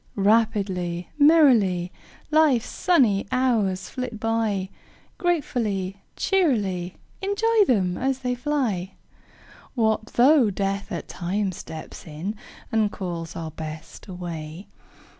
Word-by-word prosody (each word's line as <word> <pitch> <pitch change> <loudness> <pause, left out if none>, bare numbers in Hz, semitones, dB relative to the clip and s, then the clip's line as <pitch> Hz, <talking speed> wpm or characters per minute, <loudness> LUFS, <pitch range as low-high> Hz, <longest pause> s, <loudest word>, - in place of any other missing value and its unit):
Rapidly, 195 -5 +1
merrily, 240 - +5 0.4
Life's 300 -7 +4
sunny 250 - +2
hours 215 -8 +1
flit 250 -4 -5
by, 220 -4 0 0.5
Gratefully, 215 - -1
cheerily 205 - 0 0.3
Enjoy 415 +2 +3
them 185 -7 +1
as 265 0 0
they 250 - +1
fly! 245 -9 -1 0.8
What 220 -2 +1
though 255 -1 +5
Death 195 +1 -2
at - - -4
times 190 +1 -2
steps 160 +1 -9
in, 160 +7 -4 0.4
And 220 -2 +2
calls 170 -3 -5
our 160 -1 -5
Best 155 +3 -8
away? 170 -1 -7
205 Hz, 105 wpm, -24 LUFS, 180-255 Hz, 0.8 s, merrily